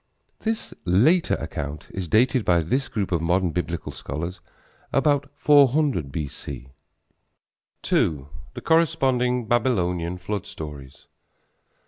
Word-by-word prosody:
This 225 0 -3
later 125 - +3
account 75 -2 -6
is 95 -2 -4
dated 125 - +3
by 85 -3 +3
this 130 - -1
group 100 -5 -2
of 85 -3 +1
modern 90 +1 +1
Biblical 85 0 -3
scholars 85 +3 -6 0.5
about 140 0 +2
400 145 - +3
B.C. 70 -3 -6 1.2
II. 70 -4 +2 0.3
THE - - -6
CORRESPONDING 130 -7 +2
BABYLONIAN 90 -8 0
FLOOD 100 +2 -4
STORIES. 70 -4 -9
95 Hz, 105 wpm, -24 LUFS, 85-130 Hz, 1.2 s, later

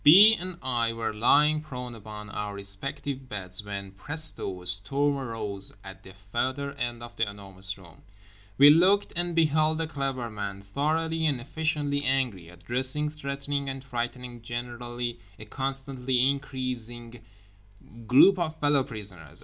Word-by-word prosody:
B. 200 +9 +10
and 185 -3 -6
I 120 -3 +1
were 115 -1 -3
lying 150 +7 +4
prone 125 -5 -7
upon 105 -1 -9
our 105 0 -4
respective 130 +7 -5
beds 95 -1 -1
when—presto, 100 - -1
a - - -14
storm 135 +11 +4
arose 110 -6 -3
at 95 0 -11
the 95 0 -14 0.2
further 130 +4 -1
end 120 -3 -4
of 120 0 -10
The 110 -2 0
Enormous 95 -1 -3
Room. 85 -4 -16 0.6
We 145 +2 +9
looked, 185 +6 +4
and 175 0 -1
beheld 155 -1 +3
The 165 - -1
Clever 135 -5 -3
Man, 100 -2 -5
thoroughly 160 +8 0
and 140 -4 0
efficiently 145 +1 -1
angry, 125 -11 0
addressing, 130 +11 0
threatening 140 -1 -4
and 135 0 -6
frightening 120 -1 -5
generally 120 0 -5 0.2
a 110 - -10
constantly 130 0 -1
increasing 120 -4 -5 0.9
group 180 - +7
of 160 -2 -1
fellow 145 -2 +3
prisoners. 105 - -5
125 Hz, 140 wpm, -27 LUFS, 105-145 Hz, 0.9 s, B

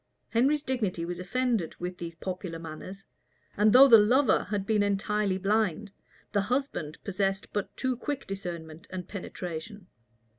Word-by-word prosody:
Henry's 280 +6 +2
dignity 210 - -1
was 175 0 -5
offended 230 -2 -1
with 180 0 -5
these 170 -1 -6
popular 180 0 -5
manners; 165 +4 -8 0.5
and 210 +1 +4
though 265 +4 +9
the 230 -4 +9
lover 245 +5 +4
had 200 0 -2
been 215 0 +2
entirely 205 -1 +1
blind, 205 0 0 0.4
the 205 - +2
husband 225 - -2
possessed 195 0 -1
but 205 -2 -3
too 260 -1 0
quick 275 +3 -4
discernment 170 -5 -6
and 185 -2 -6
penetration. 185 0 -6
200 Hz, 145 wpm, -28 LUFS, 180-225 Hz, 0.5 s, though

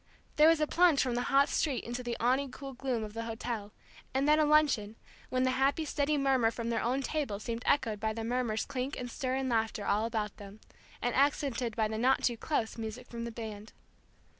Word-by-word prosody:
There 300 +1 +7
was 325 -1 +5
a 305 - +3
plunge 335 -2 +4
from 255 -2 +1
the 240 - 0
hot 275 +1 +5
street 280 -6 0
into 240 +1 -4
the 240 -1 -3
awning 260 +4 +2
cool 275 +1 -8
gloom 250 -3 -2
of 210 -1 -7
the 230 0 -4
hotel, 225 -2 -4 0.4
and 270 +2 +2
then 300 +1 +5
a 305 - +4
luncheon, 290 -9 +3 0.3
when 255 0 +1
the 255 - +2
happy 275 +5 +1
steady 290 0 0
murmur 265 -4 +3
from 230 0 -4
their 230 - 0
own 255 +4 0
table 270 -9 -2
seemed 230 +2 -4
echoed 220 -7 +2
by 220 +1 -1
the 225 +1 -4
murmurs 235 -2 -1
clink 270 0 -3
and 245 -1 -5
stir 260 -1 -2
and 265 0 -1
laughter 225 -3 0
all 210 +3 +1
about 220 -3 -3
them, 200 +1 -11 0.4
and 245 - +1
accented 265 -4 +1
by 220 -2 +1
the 220 0 -4
not 260 +3 +3
too 240 - +2
close 230 -2 -2
music 225 +3 -6
from 235 -1 -5
the 235 - -5
band. 215 -2 -8
245 Hz, 220 wpm, -31 LUFS, 225-275 Hz, 0.4 s, There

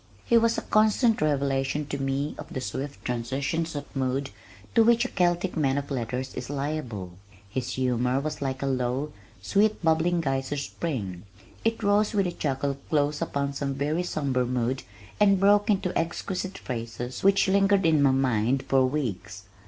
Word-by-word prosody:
He 235 - +3
was 230 0 +4
a - - -2
constant 215 +2 +3
revelation 140 -1 0
to 140 0 -4
me 135 +2 -1
of 150 - -9
the - - -3
swift 135 +2 -5
transitions 135 +7 -2
of 145 0 -7
mood 135 +1 -1 0.4
to 230 - +6
which 235 +2 +4
a - - -2
Celtic 175 0 +1
man 140 -4 +1
of 140 0 -4
letters 130 +1 -3
is - - -6
liable. 135 - -3 0.4
His 125 +1 -3
humor 125 0 +1
was 155 +1 -4
like 130 -1 -2
a - - 0
low, 130 +2 -1 0.3
sweet 215 +2 +2
bubbling 165 +2 +2
geyser 135 -1 -1
spring. 120 - -4 0.4
It 225 0 0
rose 205 +2 +2
with 200 -2 +3
a 175 - -1
chuckle 140 -3 -2
close 145 -1 +1
upon 140 0 -1
some 140 -1 -2
very 150 +5 0
somber 140 -7 0
mood 125 +1 -1 0.4
and 200 -2 +5
broke 205 +2 +4
into 190 -3 +1
exquisite 185 +3 -2
phrases 120 +1 -5
which 195 0 +4
lingered 195 0 +3
in 155 -3 +4
my 140 - +5
mind 130 -1 +1
for 135 -1 +3
weeks. 105 -8 -4
140 Hz, 170 wpm, -26 LUFS, 130-175 Hz, 0.4 s, to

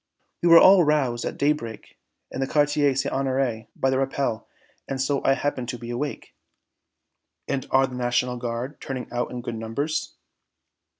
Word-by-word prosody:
"We 175 - +3
were 165 - +10
all 185 +1 +8
roused 135 -6 +1
at - - -4
daybreak 140 -6 -2 0.4
in - - -5
the 135 - 0
Quartier 145 -1 +2
St. 135 - -1
Honoré 130 -4 -1
by 135 - +1
the 130 - +1
rappel, 135 -4 -2 0.4
and 135 - -4
so 135 +1 0
I 135 - +4
happen 135 -3 -2
to 125 - -4
be 120 0 -7
awake." 140 +4 -5 1.1
"And 135 -2 -2
are 135 0 +4
the 130 - -8
National 125 0 0
Guard 120 +3 -5
turning 130 -2 -5
out 120 0 -2
in 125 -1 -6
good 120 - -4
numbers?" 115 +8 -3
130 Hz, 170 wpm, -24 LUFS, 120-145 Hz, 1.1 s, were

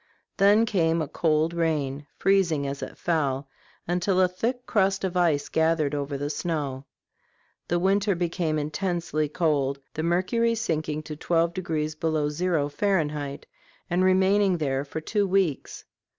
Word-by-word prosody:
Then 205 +3 +5
came 170 -6 +1
a 155 - -1
cold 160 +1 +1
rain, 150 -4 -1
freezing 175 -7 +2
as 140 0 -4
it - - -7
fell, 140 -5 -1 0.4
until 180 +2 +1
a 185 - +5
thick 235 +7 -3
crust 195 -2 +1
of 185 -1 -2
ice 165 -5 +2
gathered 160 -2 +1
over 140 -1 -2
the 145 +1 -3
snow. 145 -6 -3 0.8
The 175 - +1
weather 195 +2 +2
became 170 -2 -1
intensely 155 0 -2
cold, 145 -4 0 0.2
the 155 - -3
mercury 185 +8 +1
sinking 155 -7 -2
to 155 - -7
twelve 170 +2 +1
degrees 155 -4 -2
below 155 -1 0
zero, 160 -1 0
Fahrenheit, 150 -4 -1 0.5
and 180 +1 +2
remaining 190 0 +3
there 135 -3 -1
for 150 +2 -6
two 205 +5 0
weeks. 185 -6 -1
165 Hz, 145 wpm, -26 LUFS, 150-185 Hz, 0.8 s, Then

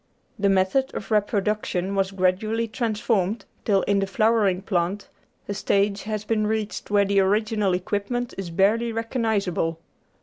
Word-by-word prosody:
The 200 0 +3
method 195 +8 +1
of 205 - -6
reproduction 205 -2 0
was 195 -1 +1
gradually 200 +4 0
transformed 215 -3 -1 0.2
till, 200 -3 +3
in 200 -1 +2
the 195 - 0
flowering 205 -3 +2
plant, 190 +1 -1 0.4
a 205 - -2
stage 200 +1 +1
has 215 -1 -3
been 215 -1 +1
reached 215 -1 -3
where 205 -1 +4
the 200 0 +2
original 205 0 +2
equipment 205 +6 -2
is 195 -3 -5
barely 210 +7 +2
recognisable. 220 -8 -1
205 Hz, 140 wpm, -24 LUFS, 195-220 Hz, 0.4 s, where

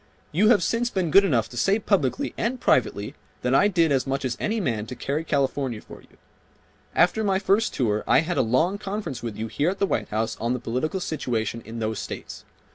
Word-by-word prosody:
You 205 +7 +4
have 235 -4 +5
since 240 +1 0
been 185 -7 -1
good 195 +5 +7
enough 125 - +1
to 120 - -10
say 195 - +3
publicly 200 - 0
and 250 +2 -2
privately 105 - +1 0.3
that 125 +1 +1
I 195 +9 +5
did 170 -6 +2
as 135 -1 +1
much 135 0 -1
as 125 -2 -1
any 220 +2 -1
man 115 - -2
to 125 - -6
carry 145 +5 -2
California 135 -5 -1
for - - -13
you. - - -24 0.8
After 180 +6 +3
my 195 -2 +2
first 200 +4 +2
tour 110 -5 0
I - - +5
had 175 +2 -2
a - - +6
long 160 - +1
conference 200 - -4
with 115 -4 -5
you 110 - -3
here 145 +8 0
at 195 - -3
the 200 - +2
White - - -2
House 110 +1 -2
on 115 +2 0
the 125 - -2
political 130 +10 -2
situation 115 - -2
in 115 +1 -8
those 110 -1 -2
states. - - -7
145 Hz, 220 wpm, -25 LUFS, 120-195 Hz, 0.8 s, good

